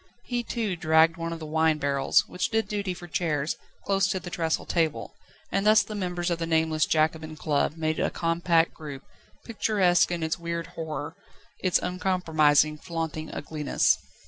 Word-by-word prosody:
He 245 -1 -1
too 220 -5 -2
dragged 160 0 +4
one 165 0 -3
of 165 - -4
the 160 - -8
wine 160 0 +2
barrels, 140 -2 +2
which 180 - -2
did 225 0 0
duty 200 -3 -2
for 175 - -10
chairs, 155 -2 -1 0.3
close 195 -1 +2
to 190 - -1
the 175 -1 -8
trestle 165 -2 -1
table, 160 -3 -1 0.4
and 195 - +1
thus 215 0 +6
the 215 - -8
members 180 -3 -2
of 170 - -1
the 165 - -2
nameless 160 -1 +2
Jacobin 155 0 0
club 150 0 0
made 155 0 -1
a - - +1
compact 165 0 +1
group, 145 -3 -8 0.4
picturesque 200 -7 +2
in 170 -2 -2
its 160 +2 -1
weird 170 0 -3
horror, 155 -2 -5 0.5
its 185 -2 +2
uncompromising, 160 -5 +2
flaunting 160 -2 -4
ugliness. 150 0 +1
165 Hz, 170 wpm, -26 LUFS, 155-180 Hz, 0.5 s, thus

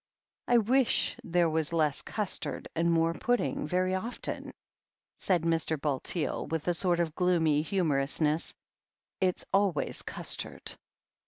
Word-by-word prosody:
"I 240 - +5
wish 245 +3 +3
there 175 0 +2
was 160 0 0
less 155 -4 +1
custard 210 -3 -2
and 170 +1 +2
more 165 0 +2
pudding, 245 -7 -1
very 185 +3 +1
often," 220 +6 -4 0.7
said 180 -4 +1
Mr. 165 -2 0
Bulteel, 150 +3 -1
with 160 +1 -3
a 175 - +3
sort 175 0 +1
of 165 -3 0
gloomy 160 -4 +2
himiorousness. 155 -3 0 0.6
"It's 185 -1 0
always 195 -6 +1
custard." - - -2
170 Hz, 120 wpm, -29 LUFS, 155-185 Hz, 0.7 s, I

